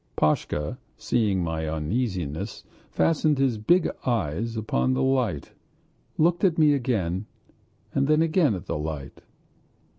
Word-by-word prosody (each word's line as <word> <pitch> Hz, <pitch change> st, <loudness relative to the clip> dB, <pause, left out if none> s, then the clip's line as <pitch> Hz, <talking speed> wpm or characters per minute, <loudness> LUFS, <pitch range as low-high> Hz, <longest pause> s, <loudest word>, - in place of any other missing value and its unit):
Pashka, 75 Hz, -1 st, 0 dB, 0.2 s
seeing 105 Hz, -6 st, +1 dB
my 80 Hz, -1 st, -2 dB
uneasiness, 90 Hz, -, -3 dB, 0.3 s
fastened 155 Hz, -2 st, +2 dB
his 130 Hz, -5 st, +1 dB
big 175 Hz, +12 st, +3 dB, 0.2 s
eyes 115 Hz, -, -1 dB
upon 110 Hz, +4 st, 0 dB
the 130 Hz, -, +1 dB
light, 125 Hz, -, 0 dB, 0.7 s
looked 170 Hz, +4 st, +2 dB
at 180 Hz, -4 st, +3 dB
me 155 Hz, -2 st, +5 dB
again, 105 Hz, -8 st, -1 dB, 0.7 s
then 150 Hz, +4 st, +3 dB
again 160 Hz, -, +2 dB
at 90 Hz, -, -7 dB
the -, -, -3 dB
light.... 75 Hz, -3 st, -6 dB
115 Hz, 120 wpm, -25 LUFS, 80-135 Hz, 0.7 s, me